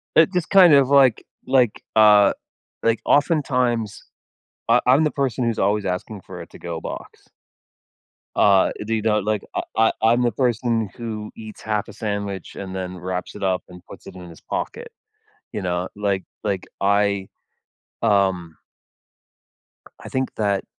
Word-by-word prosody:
It 160 +4 +5
just 180 -2 -1
kind 185 -5 +7
of, 140 -2 +5
like 135 -4 +4 0.3
like, 125 -5 +2
uh 105 -2 +6 0.5
like, 115 -1 +2
oftentimes, 125 - +1 0.7
I 120 +2 +5
I'm 135 +5 +5
the 155 - +1
person 130 -4 -1
who's 115 -2 -1
always 105 +1 +1
asking 95 +2 -4
for - - -10
a - - -8
to-go 85 -1 -7
box. - - -9 1.1
Uh, 100 -2 +4
do 115 - -2
you 110 - -1
know 105 -1 +2
like, 105 0 -1
I - - +1 0.2
I 110 0 +4
I'm 115 +2 +3
the 120 -1 +2
person 115 -2 0
who 110 -2 -6
eats 110 -1 -10
half 105 -1 -2
a - - -11
sandwich 100 -3 -4
and 95 -1 -7
then 90 -1 -5
wraps 90 +1 -5
it 105 - -7
up 95 -1 0
and 90 0 -12
puts - - -13
it - - -11
in 90 -1 -10
his 85 - -14
pocket. 470 0 -5 0.6
You 100 - -4
know? 90 0 -2
Like 100 -2 -1 0.2
like, 95 -2 -2
I, 100 -1 +1 0.7
um 95 -6 +1 1.4
I - - -10
think 130 0 -2
that, 100 -2 0
105 Hz, 160 wpm, -22 LUFS, 95-120 Hz, 1.4 s, kind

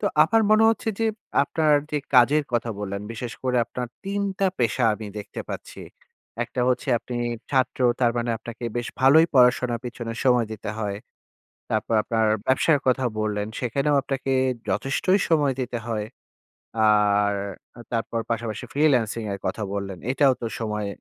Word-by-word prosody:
তো - - -3 0.2
আমার 225 +8 +3
মনে 215 +1 +6
হচ্ছে 225 +1 0
যে 225 - +1 0.4
আপনার 155 +1 +1 0.2
যে 150 - 0 0.2
কাজের 140 +5 +5
কথা 120 -1 0
বললেন, 100 -1 -4
বিশেষ 115 +1 -5
করে 125 -1 0
আপনার 125 +1 -5 0.2
৩ 200 +1 -2 0.2
টা 195 - +3
পেশা 120 +1 +1
আমি 110 0 -8
দেখতে 105 - -7
পাচ্ছি। - - -7 0.6
একটা - - -5
হচ্ছে 130 +2 -1
আপনি 120 +1 -6 0.3
ছাত্র 130 -1 +1 0.2
তার 120 -2 +4
মানে 120 0 -1
আপনাকে 120 +1 -8
বেশ 120 0 -2
ভালোই 145 +5 +6
পড়াশোনা 125 -1 +4
পিছনে 120 -1 -5
সময় 125 -3 +4
দিতে 105 -1 -5
হয়। 100 -2 -2 0.7
তারপর 115 - 0
আপনার 110 0 +1 0.2
ব্যবসার 145 +3 +3
কথা 130 0 +2 0.2
বললেন, 105 -1 -1
সেখানেও 140 +4 0
আপনাকে 135 -1 -2 0.4
যথেষ্টই 185 +8 +1
সময় 145 -5 +2
দিতে 120 -1 -4
হয়। 110 -2 -2 0.8
আর 105 -1 +3 0.6
তারপর 115 0 -1
পাশাপাশি 115 -2 -3
ফ্রিল্যান্সিং 125 -7 +2
এর 100 - -5
কথা 110 - -2
বললেন। 100 -2 -4
এটাও 135 -1 +4
তো 115 - -3
সময় 105 -2 -2
120 Hz, 155 wpm, -24 LUFS, 110-140 Hz, 0.8 s, মনে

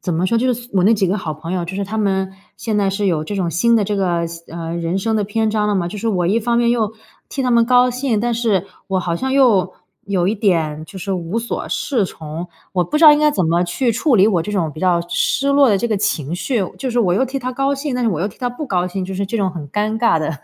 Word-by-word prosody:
怎 180 - -2
么 170 +3 0
说， 230 +4 +2
就 255 +2 +2
是 240 +1 -10
我 185 -2 +2
那 225 +2 +5
几 195 -2 +1
个 200 +3 0
好 155 -4 -4
朋 165 +3 -7
友， 180 -2 -1
就 175 +3 -6
是 200 0 -2
他 220 +3 -4
们 190 -2 0 0.2
现 215 -2 -2
在 200 - +2
是 195 +1 -1
有 155 -4 0
这 205 - -5
种 180 -4 -1
新 230 +8 +2
的 215 - +2
这 205 +1 -2
个 175 -3 0
新 170 0 -10
呃， 165 0 -4
人 170 +2 -2
生 220 +2 0
的 210 - 0
篇 220 +2 0
章 210 -1 0
了 205 - +1
嘛。 175 -3 0
就 205 +3 -7
是 230 - -4
我 180 -5 0
一 205 +6 +2
方 235 +1 0
面 235 0 +3
又 225 -3 0 0.4
替 270 - -3
他 250 - 0
们 235 -1 +4
高 250 0 +4
兴， 250 -4 -1
但 240 0 0
是 220 -5 0 0.2
我 190 -1 0
好 175 -2 -2
像 265 +5 -2
又 215 -9 +3 0.3
有 185 -3 0
一 210 - +1
点 165 -7 0
就 190 - -10
是 195 +1 -3
无 180 +4 -2
所 235 0 -4
适 235 -9 0
从。 160 +2 -7 0.2
我 180 -2 +2
不 235 - -2
知 320 - +4
道 300 - +11
应 295 - +3
该 300 0 +4
怎 185 - 0
么 170 +2 +2
去 230 +8 0
处 250 +1 +2
理 195 - +6
我 180 -7 +2
这 210 - -5
种 170 -7 -1
比 155 - -10
较 180 -2 +2
失 275 +9 +1
落 280 -2 +5
的 205 - +3
这 235 - -1
个 220 - 0
情 155 -5 -1
绪， 225 +2 -1
就 265 - -3
是 240 - -1
我 185 -6 +3
又 220 +8 +2
替 270 +2 -3
他 255 0 -4
高 275 +2 0
兴， 275 -1 -3
但 250 - -1
是 230 - +2
我 165 -3 -2
又 - - +1
替 205 - -9
他 245 - -1
不 260 +5 -6
高 180 -3 0
兴， 185 +1 -4
就 190 - -6
是 195 +1 -2
这 230 +4 -2
种 195 -3 0
很 155 -5 -7
尴 215 +5 -1
尬 230 -8 +3
的 155 +1 -2
200 Hz, 325 characters per minute, -19 LUFS, 180-235 Hz, 0.4 s, 道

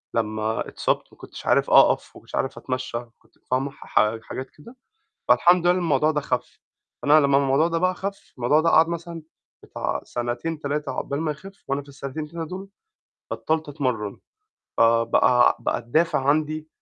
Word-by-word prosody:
لمّا 110 0 -1
اتصابت - - -1
ما - - -19
كُنتش - - -11
عارف - - +3
أقف، - - +5
ما - - -12
كنتش - - -9
عارف 135 - -2
أتمشى، 130 -2 -3 0.2
كنت - - -31 0.2
فاهمة، 135 +2 0
ح 110 -4 0
حاجات 130 0 -6
كده، 230 - -16 0.5
فالحمد 170 +8 +5
لله 175 - +5
إن 180 - +1
الموضوع 155 -3 +2
ده 150 -1 -1
خَف، - - -3 0.4
فأنا 150 +2 +6
لمّا 140 -2 +4
الموضوع 140 +3 +3
ده 165 -1 -1
بقى 185 +1 +1
خَف، 195 +1 -6
الموضوع 130 +6 +3
ده 165 - +2
قعد 160 0 +5
مثلًا 170 0 -5 0.4
بتاع - - -3
سنتين 120 +7 -3
3 145 -1 -2
عقبال 140 +3 -3
ما 155 -2 0
يخِف، 195 +7 -11
وأنا 140 +1 -1
في 140 - -17
السنتين 140 +2 -6
3 165 0 -6
دُول 190 +2 -7 0.6
بطلّت 160 -1 -1
أتمرن، 125 -8 -2 0.6
آآ 115 0 +5
بقى 120 +1 +4
بقى - - -1
الدافع 135 +3 +1
عندي 155 +1 0
145 Hz, 175 wpm, -24 LUFS, 130-165 Hz, 0.6 s, فأنا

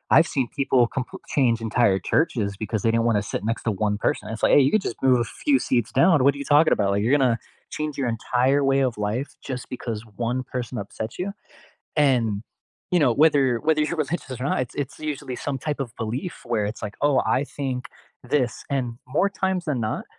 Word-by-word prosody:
I've 160 +3 +6
seen 130 -4 +1
people 130 -2 +3
compl 130 -2 -4 0.2
change 120 -5 +3
entire 105 -5 +3
churches 125 -10 +2
because 110 -1 -2
they 115 - +2
didn't 115 0 +2
wanna 105 -2 +2
sit - - -3
next 115 +1 -2
to 115 - +1
1 105 0 0
person. - - +1
It's 115 - -6
like, - - +4
"Hey, - - +8
you 135 - +2
could 215 - +3
just - - -10
move 130 -2 +5
a - - +2 0.2
few 285 -2 +5
seats 120 -3 +1
down, 165 -6 +4
what 140 0 +5
are - - -8
you - - -5
talking 155 +1 +6
about?" 100 -2 +1
Like, 100 +1 +1
"You're 135 +6 +4
gonna 125 -4 +2 0.4
change 155 -1 -2
your 130 - 0
entire 130 +5 +1
way 135 0 +3
of 115 - -15
life 125 +6 -3 0.2
just 125 -2 -4
because 115 -3 -4 0.3
1 125 - -1
person 125 0 -3
upsets 110 - -6
you." 195 +2 -2 0.7
And, 135 -6 +4 0.7
you - - +6
know, 125 -4 +4
whether 145 -3 +5 0.2
whether 155 -1 +3
you're 165 +3 -1
religious 135 -6 -5
or 130 - -2
not, - - +1
it's 120 - -17
it's 140 +2 -11 0.2
usually 130 -2 -7
some 135 -2 -1
type 145 +1 -3
of - - -13
belief 125 - -3 0.2
where 110 -3 +1
it's 115 - -11
like, 105 - -10
"Oh, 145 - +3
I - - +2 0.2
think 130 -3 -2 0.5
this," 125 -5 +2 0.2
and 135 -2 +1 0.3
more 200 - +4
times 190 -2 +1
than 140 -6 -1
not, - - -4
130 Hz, 225 wpm, -24 LUFS, 115-145 Hz, 0.7 s, Hey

